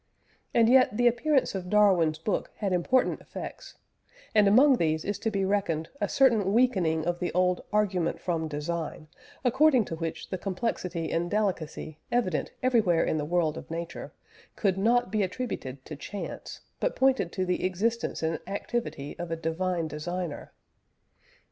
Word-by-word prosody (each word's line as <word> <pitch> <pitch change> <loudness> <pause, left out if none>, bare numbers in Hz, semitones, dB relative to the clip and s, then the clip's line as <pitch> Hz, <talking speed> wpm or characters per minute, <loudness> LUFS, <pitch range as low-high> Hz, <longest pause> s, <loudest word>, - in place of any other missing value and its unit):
And 230 -1 +4
yet 255 -3 +5
the 245 - +2
appearance 255 +4 +2
of 185 -2 -5
Darwin's 185 -7 +4
book 180 +6 -2
had 200 -3 -1
important 235 +9 +2
effects, - - -8 0.6
and 210 -2 +5
among 260 +6 +6
these 160 -3 0
is 205 - -2
to 225 - 0
be 200 -3 0
reckoned 180 -5 0
a - - 0
certain 225 -8 +3
weakening 185 -10 +2
of 175 0 -1
the 180 - -2
old 180 0 +2
"Argument 190 -5 +1
from 165 -3 -2
Design," 155 +1 -4 0.4
according 260 -1 +4
to 165 - -5
which 165 0 -5
the 185 - -2
complexity 180 -4 -3
and 170 +1 0
delicacy 170 -7 -2
evident 230 -9 0
everywhere 220 -10 +3
in 155 - 0
the 145 - -2
world 165 -1 0
of - - -13
nature, 165 +1 -5 0.4
could 195 -4 +1
not 225 +1 +2
be 215 -1 +1
attributed 180 - -4
to 155 - -7
chance, 200 +7 -7 0.2
but - - 0
pointed 260 -9 +2
to 185 - -1
the 180 0 -1
existence 205 +3 -1
and 160 0 0
activity 200 -8 -4
of 175 -1 -4
a 165 - -1
divine 165 +1 -1
Designer. 170 +2 -5
185 Hz, 160 wpm, -28 LUFS, 165-220 Hz, 0.6 s, among